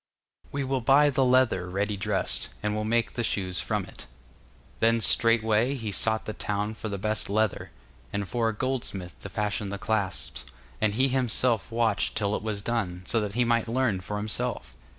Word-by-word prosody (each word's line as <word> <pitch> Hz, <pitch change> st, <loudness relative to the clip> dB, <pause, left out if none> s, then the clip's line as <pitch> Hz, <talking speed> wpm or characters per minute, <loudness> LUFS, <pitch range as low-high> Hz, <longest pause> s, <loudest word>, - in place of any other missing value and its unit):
We 140 Hz, 0 st, -2 dB
will 135 Hz, -1 st, -1 dB
buy 145 Hz, +4 st, +5 dB
the 135 Hz, 0 st, +2 dB
leather 125 Hz, -8 st, +3 dB
ready 100 Hz, +3 st, -1 dB
dressed, 95 Hz, -, 0 dB
and 105 Hz, 0 st, 0 dB
will 105 Hz, -, -1 dB
make 115 Hz, +1 st, +1 dB
the 120 Hz, -, -2 dB
shoes 90 Hz, -5 st, -1 dB
from -, -, -1 dB
it. -, -, -12 dB, 0.7 s
Then 115 Hz, +1 st, +3 dB
straightway 115 Hz, +3 st, +3 dB
he 115 Hz, -5 st, -4 dB
sought 110 Hz, +2 st, +1 dB
the 110 Hz, -, -4 dB
town 105 Hz, +1 st, -2 dB
for 110 Hz, 0 st, -6 dB
the 100 Hz, -, -3 dB
best 105 Hz, 0 st, -2 dB
leather, 110 Hz, 0 st, 0 dB, 0.4 s
and 100 Hz, -1 st, -2 dB
for 115 Hz, 0 st, 0 dB
a -, -, -2 dB
goldsmith 110 Hz, -7 st, -3 dB
to -, -, -7 dB
fashion 105 Hz, -1 st, -2 dB
the 100 Hz, -, -4 dB
clasps, 100 Hz, -8 st, -1 dB, 0.4 s
and 105 Hz, -1 st, +2 dB
he 130 Hz, +3 st, +3 dB
himself 125 Hz, -3 st, +1 dB
watched 115 Hz, -2 st, +1 dB
till 105 Hz, -1 st, +1 dB
it -, -, -3 dB
was 105 Hz, -2 st, -3 dB
done, 95 Hz, -7 st, -2 dB
so 115 Hz, -, +1 dB
that 105 Hz, 0 st, -4 dB
he 125 Hz, 0 st, +3 dB
might 115 Hz, -1 st, +2 dB
learn 115 Hz, -5 st, +1 dB
for 105 Hz, +3 st, -4 dB
himself. 105 Hz, -10 st, -2 dB
110 Hz, 190 wpm, -27 LUFS, 100-120 Hz, 0.7 s, buy